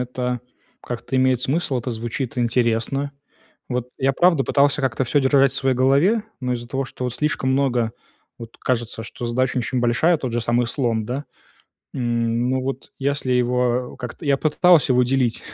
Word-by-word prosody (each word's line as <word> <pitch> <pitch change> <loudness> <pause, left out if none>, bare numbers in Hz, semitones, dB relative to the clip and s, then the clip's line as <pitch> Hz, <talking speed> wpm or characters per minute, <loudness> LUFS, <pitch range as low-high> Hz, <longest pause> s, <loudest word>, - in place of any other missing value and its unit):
это 125 0 -3 0.4
как-то 120 +2 -4
имеет 130 -1 +3
смысл, 140 0 0
это 125 +1 -4
звучит 120 +3 -4
интересно. 120 +3 0 0.6
Вот 125 -1 -2
я 135 +1 +2
правда 165 -2 +3
пытался 145 +1 +2
как-то 130 -1 0
всё 145 +4 +2
держать 135 0 +4
в - - -9
своей 135 -1 +1
голове, 140 - +3 0.2
но 125 -1 -1
из-за 120 0 -6
того, 135 +2 -2
что, 130 - -7
вот 125 -1 -2
слишком 145 -3 0
много, 125 -4 +1 0.5
вот 115 -1 -10
кажется, 120 -3 -2
что 120 +2 -8
задача 125 +2 0
очень 125 +1 -1
большая, 120 +9 +3
тот 130 -4 -4
же 120 - 0
самый 120 +1 +1
слон, 115 -3 -1
да. 130 +6 -4 0.7
М. 120 0 0
Ну 130 0 0
вот 135 +1 -5
если 140 -1 -1
его, 125 0 +1
э, - - -20
как-то 125 +6 -7
я 140 -1 +3
попытался 160 0 +4
его 125 0 +4
делить 125 -2 0
125 Hz, 180 wpm, -22 LUFS, 120-135 Hz, 0.7 s, держать